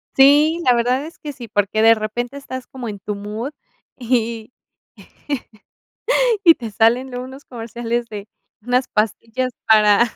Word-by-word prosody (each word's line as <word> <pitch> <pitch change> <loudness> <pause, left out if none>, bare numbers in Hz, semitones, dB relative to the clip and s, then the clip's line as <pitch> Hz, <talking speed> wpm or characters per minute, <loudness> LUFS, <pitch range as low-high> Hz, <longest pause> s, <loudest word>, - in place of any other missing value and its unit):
Sí, 295 +5 +5
la 250 - +6
verdad 250 +4 +1
es 330 - -11
que 295 -1 -6
sí, 245 -3 -9
porque 205 0 0
de 225 +1 +7
repente 240 +5 -4
estás 260 -2 -7
como 250 -4 -7
en 205 - -7
tu 210 +2 -4
mood 210 +6 -5 0.5
y 235 -2 -1 1.9
y 330 - +9
te 230 -6 -7
salen 245 +4 +2
unos 265 +3 -9
comerciales 235 0 -4
de 210 -1 -8 0.3
unas 250 +2 +1
pastillas 230 +4 -1
para 210 -1 +6
235 Hz, 140 wpm, -20 LUFS, 220-260 Hz, 1.9 s, y